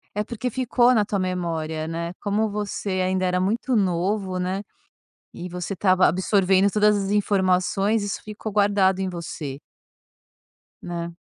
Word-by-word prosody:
É 210 - 0
porque 240 +2 -4
ficou 250 0 +3
na 215 -4 +3
tua 200 -2 -2
memória, 165 -4 -2
né, 170 +1 -4
como 210 +1 0
você 200 -2 -3
ainda 185 0 0
era 180 0 +1
muito 230 +6 0
novo, 185 0 0
né, 185 +2 -2 0.7
e 180 - -7
você 180 +2 -5
estava 185 0 +3
absorvendo 190 +2 +3
todas 210 0 +3
as 195 0 -2
informações 200 +1 +1
isso 205 - -4
ficou 215 0 -6
guardado 200 -2 +3
em 190 - -1
você. 160 -5 -6 1.2
Né. 170 -1 -5
190 Hz, 145 wpm, -24 LUFS, 180-210 Hz, 1.2 s, ficou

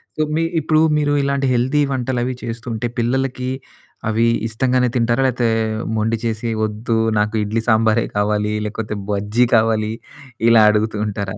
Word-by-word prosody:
So, 155 - -2
మీ 165 - +1 0.2
ఇప్పుడు 155 +1 +2 0.2
మీరు 145 -1 +1
ఇలాంటి 140 -1 0
హెల్తీ 130 +5 +1
వంటలు 130 -1 -1
అవి 130 0 -2
చేస్తుంటే, 120 0 -4
పిల్లలకి 130 +1 -1 0.6
అవి 115 +1 +2 0.2
ఇష్టంగానే 125 +2 +1
తింటారా? 120 +3 +1
లేతే 120 -2 0 0.5
మొండి 110 +1 0
చేసి, 115 0 -2 0.2
వద్దు 110 +2 -2 0.2
నాకు 105 +1 0
ఇడ్లీ 110 +2 -2
సాంబారే 110 +1 +3
కావాలి 105 0 0
లేకోతే 105 0 -4 0.2
బజ్జీ 105 +4 +1
కావాలి. 110 -1 +2 0.6
ఇలా 115 -2 +6
అడుగుతూ 105 0 -1
ఉంటారా? 100 0 -4
115 Hz, 140 wpm, -19 LUFS, 110-125 Hz, 0.6 s, ఇలా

